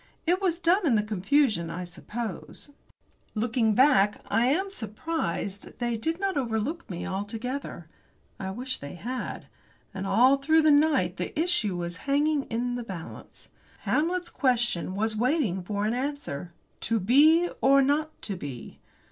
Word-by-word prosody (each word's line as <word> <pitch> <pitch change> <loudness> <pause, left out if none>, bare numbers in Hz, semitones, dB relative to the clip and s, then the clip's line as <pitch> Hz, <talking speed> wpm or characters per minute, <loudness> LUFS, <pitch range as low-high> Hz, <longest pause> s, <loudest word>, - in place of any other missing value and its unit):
It 355 +3 +2
was 355 -3 +1
done 355 +1 +2
in 245 - +4
the 210 - +2
confusion, 210 - +1
I 180 +2 -4
suppose. 205 - -7 0.6
Looking 220 -1 +1
back, 210 -6 +4
I 230 +4 +3
am 380 +9 +1
surprised 215 - -4
they 240 -1 -1
did 325 +10 -2
not 390 -5 -1
overlook 255 +6 -2
me 175 -2 -5
altogether. 215 - -4 0.5
I 190 - -4
wish 255 +6 -3
they 140 +4 -8
had. 250 +8 -5 0.5
And 195 0 -4
all 250 +8 +5
through 315 +3 +3
the 310 - +6
night 300 +2 +3
the - - -4
issue 320 - +1
was 175 0 -4
hanging 290 0 +2
in 245 +2 -2
the 245 0 -3
balance. 185 -7 -9 0.3
Hamlet's 345 +3 0
question 240 - +1
was 220 +2 0
waiting 240 - +1
for 205 +3 -2
an 220 - +1
answer. 255 - -4 0.3
"To 225 -1 0
be, 305 - +5
or 275 +1 +6
not 305 +3 0
to 200 - -3
be?" 140 -9 -8
240 Hz, 150 wpm, -27 LUFS, 200-295 Hz, 0.6 s, the